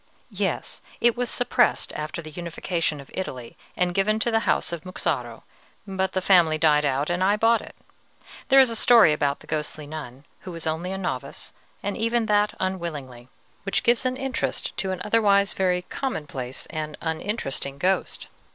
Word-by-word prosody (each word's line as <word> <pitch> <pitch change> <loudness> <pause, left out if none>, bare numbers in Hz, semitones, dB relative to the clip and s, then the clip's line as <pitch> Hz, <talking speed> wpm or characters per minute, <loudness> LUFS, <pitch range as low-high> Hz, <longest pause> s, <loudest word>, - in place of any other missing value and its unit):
"Yes; - - -2 0.2
it 235 -1 +4
was 245 -1 -2
suppressed 245 0 +1
after 155 +2 -5
the 155 - -9
unification 170 -1 -2
of 140 - -12
Italy, 130 -11 -5 0.2
and 180 -1 +1
given 205 +3 +2
to 235 - +1
the 225 0 +1
House - - +1
of 165 -2 -5
Muxaro; 140 -10 -3 0.4
but 190 -1 -2
the 185 - 0
family 175 -5 +5
died 150 -2 +4
out, 140 +3 0
and 180 +1 0
I 200 +2 +4
bought 225 +1 +4
it. - - -12 0.7
There 270 0 +7
is 260 -3 +6
a - - -3
story 225 -7 +6
about 145 -1 0
the - - -14
ghostly 150 0 -4
nun, 145 -3 -8
who 185 - -9
was 165 -2 -7
only 160 +3 -2
a 190 - -3
novice, 180 -9 -5 0.3
and 200 0 -2
even 230 +1 +1
that 210 0 +2
unwillingly, 150 -10 -4 0.3
which 195 - -1
gives 240 +1 +3
an 255 0 -1
interest 270 -1 -2
to 190 +2 -1
an 185 -1 -3
otherwise 205 -2 +3
very 180 -1 +1
commonplace 145 - -4
and 155 -1 -4
uninteresting 160 - -2
ghost." 185 +6 0
180 Hz, 175 wpm, -25 LUFS, 150-210 Hz, 0.7 s, There